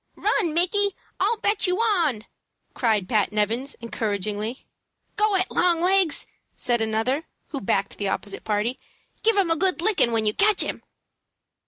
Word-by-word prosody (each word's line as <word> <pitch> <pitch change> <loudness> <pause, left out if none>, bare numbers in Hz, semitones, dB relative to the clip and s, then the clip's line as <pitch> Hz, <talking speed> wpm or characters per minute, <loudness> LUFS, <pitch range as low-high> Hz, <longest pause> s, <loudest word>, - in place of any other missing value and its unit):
"Run, 335 -7 0
Micky; 400 +3 +2 0.2
I'll 465 - +1
bet 410 -1 +1
on 365 - +1
you!" - - -13 0.5
cried 215 -6 0
Pat 215 -3 +1
Nevins, 225 +6 -1
encouragingly. 215 0 -3 0.5
"Go 420 -1 +2
it, 375 0 0
long 345 -1 +2
legs!" 370 -4 +3 0.3
said 240 -2 +1
another, 225 +8 -1 0.2
who 280 - -5
backed 195 0 -1
the 200 -1 -1
opposite 200 +1 -3
party. 215 +4 -1 0.4
"Give 450 -1 +2
him 370 -4 +2
a - - +4
good 365 +2 0
lickin' 355 - +2
when 225 -1 0
you 210 - +2
catch 415 - +4
him." - - -5
280 Hz, 155 wpm, -24 LUFS, -, 0.5 s, a